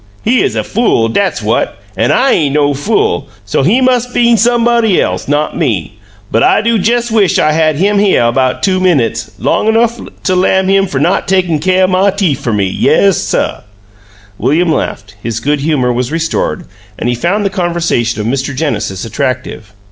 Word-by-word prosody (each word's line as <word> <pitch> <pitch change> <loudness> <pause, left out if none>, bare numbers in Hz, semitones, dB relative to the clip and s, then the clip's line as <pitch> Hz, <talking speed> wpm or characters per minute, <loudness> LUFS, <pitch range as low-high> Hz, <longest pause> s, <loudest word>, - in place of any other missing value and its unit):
He 245 +2 +2
'uz 110 - -1
a 110 - -1
fool, 155 - +1
dat's 195 - -1
what - - -1 0.2
an' - - +1
I 265 +2 +2
ain' 145 -4 +1
no 145 -1 +2
fool, 145 - -1 0.2
so 105 - 0
he 205 - +2
mus' 250 -1 +2
been 235 -1 +2
somebody 235 -3 +2
else, - - -2
not 145 +2 -1
me; 105 - -2 0.3
but 115 - +1
I - - +4
do 230 +1 +1
jes' 235 +3 0
wish 210 -4 +2
I 155 - +2
had 155 -1 +1
him 200 +6 +1
hyuh 120 -13 +2
'bout 130 0 0
two 190 -2 +1
minutes 130 -11 0
long - - 0
enough 230 +1 +1 0.2
to 185 - +1
lam 190 +1 +2
him 195 0 +2
fer 180 - -4
not - - 0
takin' 180 -4 +1
caih 185 +4 +2
o' - - +4
my 185 +2 +2
teef 190 -9 -1
fer 120 - -3
me!' 105 -2 0
Yes, 95 - +2
suh!" - - -2 0.8
William 160 +8 +1
laughed; 100 -8 -4
his 115 0 -3
good 145 +5 -1
humor 140 -4 0
was 125 +2 -2
restored 165 +2 -2 0.3
and - - -3
he 120 - +1
found 185 - -1
the 195 - 0
conversation 170 - -1
of 105 - -3
Mr. 135 +3 -2
Genesis 115 - -3
attractive. 130 -5 -4
165 Hz, 190 wpm, -12 LUFS, 125-200 Hz, 0.8 s, I